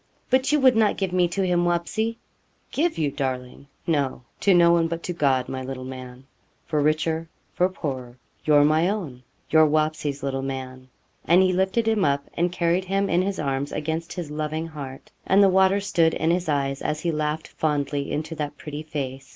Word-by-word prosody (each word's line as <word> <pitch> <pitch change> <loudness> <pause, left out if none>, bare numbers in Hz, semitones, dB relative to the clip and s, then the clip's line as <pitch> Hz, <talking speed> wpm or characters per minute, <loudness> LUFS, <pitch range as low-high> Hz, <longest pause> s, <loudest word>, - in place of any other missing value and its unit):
'But 260 +2 +3
you 300 - +4
would 260 -3 +5
not 220 -2 +3
give 190 -2 -2
me 180 -1 +3
to 190 +3 -1
him, 175 -1 +2
Wapsie?' 175 +7 -1 0.5
'Give 325 +4 0
you, 150 -3 0
darling! 130 0 -4 0.2
no 140 -6 0 0.2
to 200 - +3
no 170 -2 +6
one 170 -1 +3
but 170 0 -4
to 180 - -3
God, 135 -6 +1
my 130 - -4
little 130 0 -6
man; 130 0 -9 0.4
for 155 -3 0
richer, 160 +2 0 0.2
for 180 +1 +2
poorer, 130 -8 -5 0.3
you're 150 -1 +5
my 155 +4 +3
own 165 -12 -4 0.3
your 155 0 +6
Wapsie's 155 -2 0
little 135 -1 -2
man.' 130 -1 -6 0.4
And 175 +3 +5
he 185 0 +2
lifted 190 +5 +1
him 220 -3 +2
up, 140 0 +1
and 175 +1 0
carried 175 +1 +1
him 195 +1 0
in 175 - +3
his 195 +1 -2
arms 140 0 -2
against 160 +2 -3
his 170 -5 -6
loving 155 +1 -3
heart, 140 -4 -9 0.2
and 200 +1 +5
the 195 - +6
water 190 +1 +4
stood 170 -5 +2
in 160 +1 +1
his 175 -1 0
eyes, 140 -2 0
as 150 0 -2
he 170 - 0
laughed 155 0 -2
fondly 145 -2 -1
into 155 +2 -3
that 145 -1 -4
pretty 150 0 -6
face. 135 -3 -5
155 Hz, 195 wpm, -24 LUFS, 140-180 Hz, 0.5 s, no